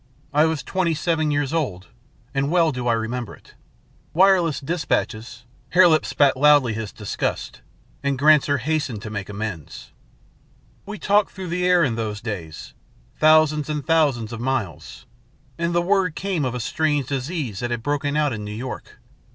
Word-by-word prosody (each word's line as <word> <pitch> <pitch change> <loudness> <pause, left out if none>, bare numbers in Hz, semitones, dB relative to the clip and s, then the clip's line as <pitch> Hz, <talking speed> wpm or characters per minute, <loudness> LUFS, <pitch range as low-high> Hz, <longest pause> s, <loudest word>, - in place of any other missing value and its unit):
I 150 +2 +4
was 160 -4 -1
twenty 175 +1 0
seven 160 -1 0
years 145 -1 -1
old, 105 - -2 0.4
and 135 +1 0
well 165 -1 +3
do 125 -2 -4
I 120 - +3
remember 115 +1 -3
it. - - -21 0.6
Wireless 180 -4 +4
despatches 130 -6 -3
" - - -34
Hare 180 0 +7
Lip 155 -2 +2
spat 140 -2 +3
loudly 145 -3 +4
his 110 -1 -5
disgust, 105 -2 -4 0.4
and 140 -1 -1
Granser 145 0 +4
hastened 130 -5 -2
to 110 - -6
make 105 -2 -5
amends. 105 -7 -6 1.0
"We 210 +1 -6
talked 205 +1 +2
through 190 -2 -7
the 180 +1 0
air 180 -1 +4
in 130 -6 +1
those 105 -2 -3
days, 90 -9 -7 0.5
thousands 155 -1 +4
and 150 -2 -3
thousands 140 -9 +1
of 115 - -6
miles. 125 -8 -4 0.5
And 170 0 0
the 175 - +2
word 185 -3 +1
came 185 -7 -2
of 125 -1 -2
a - - -3
strange 145 +3 0
disease 135 - -3
that 120 - -3
had 120 -2 -3
broken 145 +1 -1
out 150 -3 +1
in 105 -1 -5
New 105 0 -6
York. 125 +4 -7
145 Hz, 170 wpm, -22 LUFS, 115-160 Hz, 1.0 s, Hare